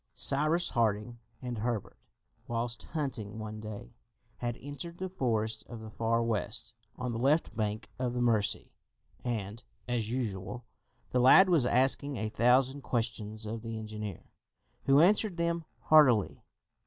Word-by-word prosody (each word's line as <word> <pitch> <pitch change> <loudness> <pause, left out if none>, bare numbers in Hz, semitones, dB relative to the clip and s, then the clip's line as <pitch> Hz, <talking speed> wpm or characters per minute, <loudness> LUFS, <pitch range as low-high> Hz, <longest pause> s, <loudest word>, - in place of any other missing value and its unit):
Cyrus 155 +5 +4
Harding 115 +1 0 0.2
and 120 -3 -4
Herbert, 115 -2 -3 0.5
whilst 115 0 -1
hunting 130 -9 -3
one 110 0 -6
day, 105 - -8 0.4
had 120 -1 -3
entered 145 +5 -8
the 185 +1 -4
forest 110 - -1
of 120 - -8
the 110 -1 -9
Far 115 +1 0
West, 115 0 -2 0.2
on 125 -1 -3
the 115 - -3
left 145 +6 +2
bank 110 0 -2
of 125 -1 -1
the - - -1
Mercy, 115 -4 +1 0.5
and, 110 -2 -3 0.3
as 120 -3 -1
usual, 120 -1 -4 0.5
the 125 - +2
lad 185 +10 +7
was 155 -9 +3
asking 135 +2 +2
a 110 -1 -2
thousand 130 +5 +3
questions 110 -3 -3
of 110 +1 -5
the 115 -1 -5
engineer, 105 -3 -7 0.5
who 135 +2 +6
answered 200 +1 +3
them 170 -1 -1 0.2
heartily. 130 -10 +4
120 Hz, 140 wpm, -31 LUFS, 110-135 Hz, 0.5 s, lad